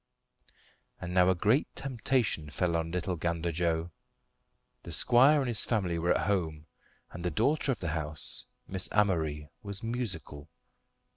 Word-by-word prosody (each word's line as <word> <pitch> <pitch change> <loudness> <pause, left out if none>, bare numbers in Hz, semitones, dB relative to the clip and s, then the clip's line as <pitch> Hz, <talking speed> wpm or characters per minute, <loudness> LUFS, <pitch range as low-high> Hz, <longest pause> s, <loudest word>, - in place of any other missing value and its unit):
And 90 0 -5
now 90 0 +5
a 95 - +3
great 110 - +2
temptation 120 - 0
fell 85 +3 0
on 80 0 -1
little 90 +1 -2
Gander 85 +1 -1
Joe. 85 0 -1 0.9
The - - -9
squire 135 +5 +5
and 130 - -1
his 120 -3 +1
family 90 -7 0
were 85 +2 +3
at - - 0
home, 80 -6 -1 0.5
and 85 - -8
the 90 - +1
daughter 140 - +1
of 120 - -2
the 85 - -2
house, 75 -1 -2 0.2
Miss 95 -2 -2
Amory, 80 -8 +1
was 100 +2 -5
musical. 95 - -4
90 Hz, 150 wpm, -30 LUFS, 80-110 Hz, 0.9 s, now